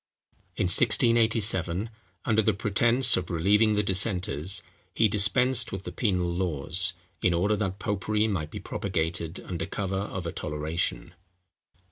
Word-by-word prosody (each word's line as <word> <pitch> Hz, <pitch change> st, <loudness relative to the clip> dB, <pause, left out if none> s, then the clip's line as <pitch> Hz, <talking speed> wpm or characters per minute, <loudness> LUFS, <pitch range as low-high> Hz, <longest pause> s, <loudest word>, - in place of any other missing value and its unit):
In -, -, -1 dB
1687, 110 Hz, -2 st, +2 dB, 0.3 s
under 110 Hz, -1 st, +2 dB
the 110 Hz, -1 st, +1 dB
pretence 115 Hz, +6 st, +3 dB
of 90 Hz, -, -3 dB
relieving 105 Hz, +6 st, +2 dB
the 105 Hz, -, +1 dB
dissenters, 95 Hz, -4 st, +1 dB, 0.3 s
he 110 Hz, -, +3 dB
dispensed 110 Hz, +5 st, +2 dB
with 95 Hz, 0 st, -6 dB
the -, -, -7 dB
penal 95 Hz, -6 st, -1 dB
laws, 90 Hz, +1 st, +2 dB, 0.3 s
in 90 Hz, -1 st, +2 dB
order 100 Hz, +5 st, +1 dB
that 95 Hz, -2 st, -3 dB
popery 105 Hz, +2 st, -1 dB
might 90 Hz, -8 st, -3 dB
be -, -, -7 dB
propagated 85 Hz, -2 st, -4 dB
under 90 Hz, -3 st, -5 dB
cover 95 Hz, -1 st, -3 dB
of 95 Hz, -2 st, -5 dB
a 85 Hz, -, -3 dB
toleration. 75 Hz, +4 st, -4 dB
95 Hz, 135 wpm, -26 LUFS, 90-105 Hz, 0.3 s, pretence